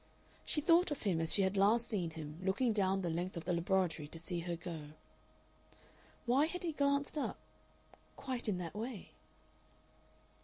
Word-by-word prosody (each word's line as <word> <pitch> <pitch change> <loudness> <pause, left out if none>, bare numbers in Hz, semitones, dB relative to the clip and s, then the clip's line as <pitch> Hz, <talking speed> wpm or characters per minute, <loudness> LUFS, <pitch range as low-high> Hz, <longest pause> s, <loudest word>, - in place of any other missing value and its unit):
She 300 - +1
thought 335 +4 +5
of 295 - -4
him 180 -6 +1
as 160 - 0
she 200 - +4
had 190 +1 +1
last 215 +4 +4
seen 185 -7 -1
him 155 -1 -7
looking 210 +5 +2
down 195 -2 +2
the 175 - 0
length 175 +2 -2
of 170 - -5
the 180 - +1
laboratory 170 -3 +1
to 165 - -7
see 175 +1 -3
her 170 0 -3
go. 165 -3 -7 1.3
Why 265 +5 +4
had 360 +2 -5
he 340 - 0
glanced 280 +1 +1
up - - -2 0.8
quite 255 -4 -3
in 195 - 0
that 170 -2 -5
way?... 225 0 -5
190 Hz, 175 wpm, -35 LUFS, 170-250 Hz, 1.3 s, thought